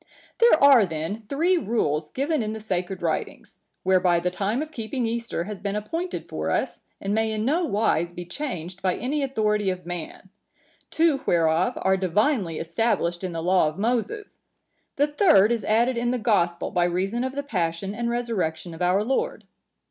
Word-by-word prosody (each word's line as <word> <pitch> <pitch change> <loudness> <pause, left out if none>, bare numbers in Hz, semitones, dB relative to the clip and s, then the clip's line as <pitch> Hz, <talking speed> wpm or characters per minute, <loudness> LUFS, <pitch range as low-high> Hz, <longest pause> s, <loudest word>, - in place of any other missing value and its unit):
"There 465 -11 +5
are 275 -5 +8
then 175 +5 -4
three 340 +6 +2
rules 155 - -1
given 285 - -1
in 215 -1 -2
the 220 - -6
Sacred 185 -3 -3
Writings, 165 - -3 0.3
whereby 185 -2 +3
the 180 +1 -1
time 210 +9 -1
of 310 - -10
keeping 240 -1 -3
Easter 230 -6 -2
has 205 +1 -7
been 200 +1 -3
appointed 330 - -4
for - - -3
us - - -1 0.2
and 195 +1 -2
may 220 0 +1
in 215 0 -2
no 330 +7 +2
wise 200 - +1
be 175 0 -7
changed 180 - -6
by 185 -2 +1
any 285 +5 -2
authority 215 -7 0
of 185 -1 -4
man; 175 +2 -7 0.6
two 315 -4 +2
whereof 165 +1 +2
are 190 0 +3
divinely 190 - +1
established 175 0 -1
in 185 - -2
the 165 0 -4
law 180 -2 +3
of 155 - -4
Moses; 245 - -2 0.6
the 285 - +3
third 295 - +4
is 235 -2 0
added 235 +3 +2
in 240 0 0
the 250 - 0
Gospel 200 -7 +1
by 175 -1 +2
reason 190 +7 -1
of 260 +1 -3
the 285 - -2
Passion 180 -5 -2
and 235 +2 -2
Resurrection 185 -9 -2
of 165 - -10
our 180 +3 +2
Lord. 270 - -1
210 Hz, 180 wpm, -25 LUFS, 180-250 Hz, 0.6 s, are